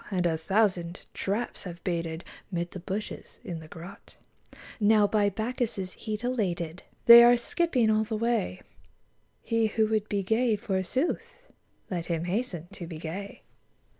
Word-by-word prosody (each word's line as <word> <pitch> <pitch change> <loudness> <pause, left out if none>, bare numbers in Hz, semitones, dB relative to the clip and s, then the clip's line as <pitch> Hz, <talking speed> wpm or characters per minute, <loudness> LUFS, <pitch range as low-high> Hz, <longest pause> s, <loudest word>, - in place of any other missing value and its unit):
And 185 -3 0
a 165 -2 +2
thousand 185 0 +1
traps 210 +4 -3
have 170 -2 -8
baited 165 -2 -2 0.3
Mid 175 -1 -2
the 185 - -7
bushes, 195 +4 -5
in 170 -2 -5
the 160 - -11
grot; 170 +3 -11 0.6
Now 210 0 +5
by 205 0 +2
Bacchus* 230 +3 -2
heat 215 +2 -5
elated 180 -9 -1 0.2
They 235 0 +11
are 240 0 +7
skipping 250 -3 +1
all 215 0 +3
the 220 0 -3
way: 225 -5 -1 0.8
He 230 -1 +2
who 220 0 +2
would 215 -1 0
be 200 -1 0
gay, 225 +3 +2
forsooth, 210 - -2 0.5
Let 170 -2 -3
him 165 -1 -1
hasten 180 -3 -2
to 170 - -7
be 165 -2 -7
gay. 180 +6 -6
200 Hz, 150 wpm, -28 LUFS, 175-225 Hz, 0.8 s, They